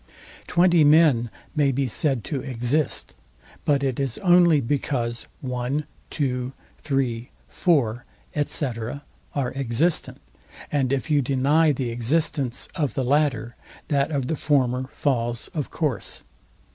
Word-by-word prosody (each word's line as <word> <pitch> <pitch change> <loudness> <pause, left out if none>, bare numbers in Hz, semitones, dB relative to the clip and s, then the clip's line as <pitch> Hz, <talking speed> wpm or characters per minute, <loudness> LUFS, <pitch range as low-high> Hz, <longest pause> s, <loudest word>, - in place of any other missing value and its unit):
Twenty 175 -2 +4
men 145 -6 +5 0.3
may 145 -3 +3
be 135 +1 0
said 130 -1 0
to 140 -4 -3
exist; 130 +3 -1 0.5
but 140 -2 +2
it 135 -2 -1
is 135 -4 -2
only 175 -4 +6
because 120 -2 -2
one, 125 +3 -2 0.3
two, 125 -2 -2 0.3
three, 130 -4 -1 0.2
four, 120 -9 +1 0.4
&c. 145 - -1 0.7
are 135 -3 -1
existent, 135 +5 0 0.5
and 135 -3 +1
if 140 +2 -1
you 145 -1 +4
deny 140 +5 +3
the 130 -4 -2
existence 125 +1 0
of 145 -4 -1
the 135 - 0
latter, 130 -4 +1 0.3
that 140 -2 +2
of 140 -4 -1
the 160 - -1
former 130 -4 +1
falls 120 -5 -1
of 150 -4 -4
course. 145 - -2
135 Hz, 125 wpm, -24 LUFS, 125-150 Hz, 0.7 s, only